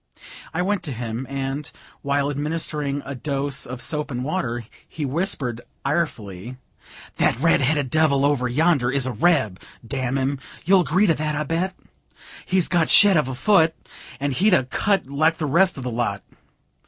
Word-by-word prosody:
I 175 Hz, +2 st, -1 dB
went 200 Hz, 0 st, 0 dB
to 145 Hz, -, -4 dB
him, 120 Hz, +1 st, -5 dB
and, 135 Hz, +1 st, -4 dB, 0.3 s
while 140 Hz, 0 st, 0 dB
administering 145 Hz, -1 st, -2 dB
a 140 Hz, -, -5 dB
dose 140 Hz, +1 st, -3 dB
of 125 Hz, 0 st, -5 dB
soap 150 Hz, -1 st, -1 dB
and 125 Hz, -2 st, -4 dB
water, 125 Hz, -7 st, -3 dB, 0.2 s
he 155 Hz, -, -5 dB
whispered, 135 Hz, -, -1 dB, 0.2 s
irefully: 125 Hz, -, -3 dB, 0.6 s
"That 115 Hz, -, +2 dB
red 165 Hz, 0 st, +3 dB
headed 140 Hz, -1 st, +1 dB
devil, 145 Hz, -3 st, +3 dB
over 140 Hz, -3 st, +1 dB
yonder, 140 Hz, -1 st, +2 dB
is 135 Hz, 0 st, +1 dB
a 130 Hz, -, -2 dB
reb, 110 Hz, -, +1 dB, 0.3 s
damn 130 Hz, +1 st, -1 dB
him! 135 Hz, +1 st, -1 dB, 0.3 s
You'll 190 Hz, +2 st, +5 dB
agree 180 Hz, +5 st, +2 dB
to 170 Hz, -, +4 dB
that, 155 Hz, -1 st, -2 dB
I'll 150 Hz, +1 st, -1 dB
bet? 175 Hz, +5 st, -2 dB, 0.7 s
He's 185 Hz, -2 st, +2 dB
got 170 Hz, -3 st, +1 dB
shet 200 Hz, -2 st, +8 dB
of 150 Hz, -5 st, +2 dB
a 130 Hz, -, -4 dB
foot, 165 Hz, +1 st, +3 dB, 0.4 s
or 145 Hz, +1 st, -1 dB
he'd 185 Hz, +9 st, +3 dB
a 130 Hz, -, +2 dB
cut 195 Hz, +10 st, 0 dB
like 155 Hz, +4 st, +1 dB
the 160 Hz, -, -2 dB
rest 175 Hz, +5 st, +3 dB
of 135 Hz, -, -6 dB
the 125 Hz, -, -3 dB
lot. 115 Hz, -4 st, -2 dB
145 Hz, 175 wpm, -22 LUFS, 130-165 Hz, 0.7 s, shet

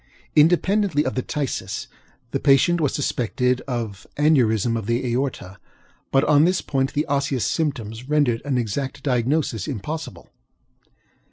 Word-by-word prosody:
Independently 175 Hz, +1 st, +3 dB
of 130 Hz, -, -1 dB
the 130 Hz, -, -1 dB
phthisis, 140 Hz, 0 st, -3 dB, 0.5 s
the 135 Hz, -, -1 dB
patient 150 Hz, +5 st, +4 dB
was 145 Hz, -, +2 dB
suspected 125 Hz, -2 st, 0 dB
of 115 Hz, -6 st, -4 dB
aneurism 120 Hz, -7 st, +3 dB
of 110 Hz, -3 st, -4 dB
the 120 Hz, +2 st, 0 dB
aorta; 120 Hz, -7 st, -3 dB, 0.5 s
but 135 Hz, -, +3 dB
on 150 Hz, 0 st, +5 dB
this 185 Hz, +2 st, +2 dB
point 135 Hz, -1 st, -1 dB
the 150 Hz, -, 0 dB
osseous 140 Hz, -3 st, 0 dB
symptoms 125 Hz, -6 st, -3 dB
rendered 145 Hz, -7 st, +2 dB
an 140 Hz, -2 st, -1 dB
exact 125 Hz, +4 st, -3 dB
diagnosis 125 Hz, -, 0 dB
impossible. 150 Hz, +7 st, -6 dB
135 Hz, 135 wpm, -22 LUFS, 120-150 Hz, 0.5 s, on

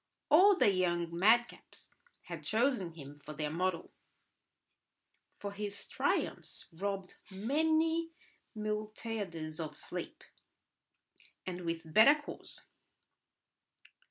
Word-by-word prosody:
All 385 Hz, +7 st, +8 dB
the 205 Hz, -, +5 dB
young 175 Hz, -2 st, 0 dB
madcaps 220 Hz, +8 st, +1 dB, 0.3 s
had -, -, -7 dB
chosen 220 Hz, -6 st, +1 dB
him 145 Hz, -2 st, -11 dB
for 155 Hz, -, -7 dB
their 150 Hz, 0 st, -3 dB
model; 180 Hz, +1 st, -1 dB, 1.5 s
for 200 Hz, -, -5 dB
his 200 Hz, 0 st, -5 dB
triumphs -, -, -1 dB
robbed 195 Hz, +1 st, -4 dB
many 315 Hz, +10 st, +1 dB
a 330 Hz, -8 st, -25 dB
Miltiades 210 Hz, -6 st, -4 dB
of 155 Hz, -2 st, -5 dB
sleep, -, -, -6 dB, 1.2 s
and 180 Hz, -1 st, -4 dB
with 165 Hz, -1 st, -3 dB
better 250 Hz, +7 st, +8 dB
cause. 290 Hz, -, -7 dB
200 Hz, 100 wpm, -33 LUFS, 170-240 Hz, 1.5 s, All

